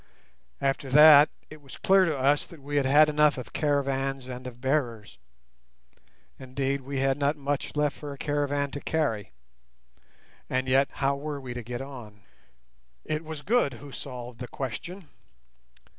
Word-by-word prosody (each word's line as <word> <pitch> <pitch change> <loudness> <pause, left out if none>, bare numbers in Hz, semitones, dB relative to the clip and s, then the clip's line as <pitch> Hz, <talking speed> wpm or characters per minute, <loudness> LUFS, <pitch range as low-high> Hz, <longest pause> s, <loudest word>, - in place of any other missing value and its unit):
After 135 0 -1
that, 150 +1 +8 0.2
it 155 -1 -11
was 135 -2 -12
clear 190 0 +4
to 155 -4 -1
us 140 +3 +2
that 165 - -13
we 145 +1 -3
had 135 -2 +2
had 150 +3 +6
enough 150 -1 +3
of 125 - -8
caravans 135 -2 -1
and 125 0 -7
of 120 -1 -10
bearers. 125 -5 -2 1.2
Indeed, 135 +1 -2
we 135 0 -3
had 135 +1 +1
not 145 +1 +1
much 145 +1 -3
left 150 -1 0
for 145 -1 -7
a 140 - -8
caravan 145 -1 -1
to 145 - -5
carry. 115 - -1 1.2
And 130 0 -1
yet, 135 +2 +3
how 140 0 0
were 145 0 -5
we 130 -2 -7
to 120 - -5
get 120 +2 -6
on? 120 -7 -11 0.8
It 155 +1 -2
was 155 -2 -7
Good 220 - +2
who 140 +4 -11
solved 125 -3 -8
the 125 - -6
question. 160 - -6
140 Hz, 160 wpm, -27 LUFS, 130-150 Hz, 1.2 s, that